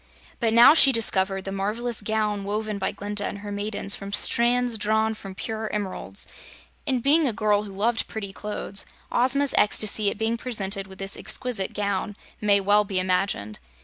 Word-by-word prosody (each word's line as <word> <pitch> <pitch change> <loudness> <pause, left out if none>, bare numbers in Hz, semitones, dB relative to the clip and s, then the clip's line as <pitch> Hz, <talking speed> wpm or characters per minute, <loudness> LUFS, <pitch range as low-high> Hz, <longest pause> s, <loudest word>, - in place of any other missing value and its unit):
But 230 -2 +1
now 235 +5 +8
she 280 -4 +7
discovered 195 -5 +1
the 195 - -4
marvelous 215 +5 -2
gown 210 -1 -1
woven 210 +1 -3
by 190 - -1
Glinda 205 0 -3
and 200 - -4
her 205 0 -8
maidens 205 0 -1
from 200 0 -8
strands 240 +1 +2
drawn 220 +1 +1
from 195 -3 -10
pure 220 +2 -5
emeralds, 205 -3 -4 0.6
and 255 -4 0
being 300 +2 +4
a 240 - 0
girl 210 -1 +1
who 200 - -9
loved 225 +4 0
pretty 200 -3 -6
clothes, 205 -1 -4 0.2
Ozma's 265 +3 +3
ecstasy 210 0 +3
at - - -5
being 225 +1 -1
presented 200 -5 -2
with 190 0 -12
this 195 0 -1
exquisite 245 -7 0
gown 200 0 -2 0.3
may 205 -1 +4
well 205 +2 +3
be 195 -2 -2
imagined. 185 - -1
210 Hz, 175 wpm, -24 LUFS, 200-225 Hz, 0.6 s, now